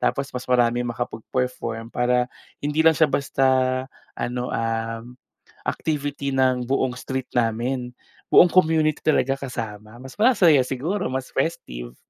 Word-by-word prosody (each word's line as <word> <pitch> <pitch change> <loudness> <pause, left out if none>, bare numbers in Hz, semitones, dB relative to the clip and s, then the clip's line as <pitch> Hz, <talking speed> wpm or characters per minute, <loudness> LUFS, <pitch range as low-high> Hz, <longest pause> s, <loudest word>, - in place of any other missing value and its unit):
tapos 140 0 0
mas 125 0 -5
marami 120 -1 +3
makapag-perform 120 -1 -3
para 125 0 +2 0.4
hindi 150 +2 -1
lang 160 -1 +6
siya 160 - +5
basta 135 -1 0 0.7
ano, 125 +1 -3
um, 115 +1 -3 0.5
activity 145 -2 -2
ng 130 -2 +2
buong 130 -2 0
street 130 -1 -4
namin, 125 +2 -1 0.3
buong 175 - +6
community 160 -4 +3
talaga 135 -3 +1
kasama, 110 -4 -6
mas 130 +9 -12
masaya 190 - +5
siguro, 160 +9 -2
mas 130 0 -4
festive. 60 - -3
125 Hz, 125 wpm, -23 LUFS, 120-140 Hz, 0.7 s, lang